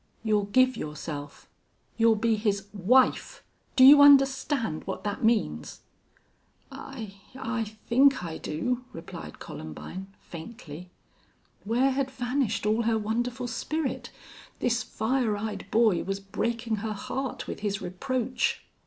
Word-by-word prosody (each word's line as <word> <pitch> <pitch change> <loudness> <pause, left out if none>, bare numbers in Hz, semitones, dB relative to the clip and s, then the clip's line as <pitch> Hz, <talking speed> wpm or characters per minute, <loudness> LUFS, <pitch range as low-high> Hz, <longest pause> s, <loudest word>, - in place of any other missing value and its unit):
You'll 210 -2 +2
give 255 +4 +3
yourself. 150 -4 -7 0.5
You'll 225 -1 +4
be 225 +1 +2
his 205 -2 -1
wife! 250 - +2 0.3
Do 260 - +6
you 285 +2 +10
understand 270 - +4
what 190 - -4
that 205 +1 -3
means?" 145 - 0 0.9
"I 200 -3 -8 0.2
I 245 -3 -2 0.2
think 265 -2 +4
I 165 -2 -5
do," 250 +11 -2
replied 165 - -9
Columbine, 175 - -8
faintly. 175 -2 -10 0.8
Where 245 +5 +2
had 270 0 -1
vanished 245 -5 -1
all 215 +2 +2
her 225 -1 +1
wonderful 240 +4 -2
spirit? 305 +5 -3 0.5
This 240 0 +1
fire 230 -2 0
eyed 215 +1 -5
boy 220 -5 +3
was 195 0 -3
breaking 230 +3 -2
her 215 +1 -3
heart 265 +6 -4
with - - -6
his 205 -1 -2
reproach. 250 +6 -2
225 Hz, 125 wpm, -27 LUFS, 200-255 Hz, 0.9 s, you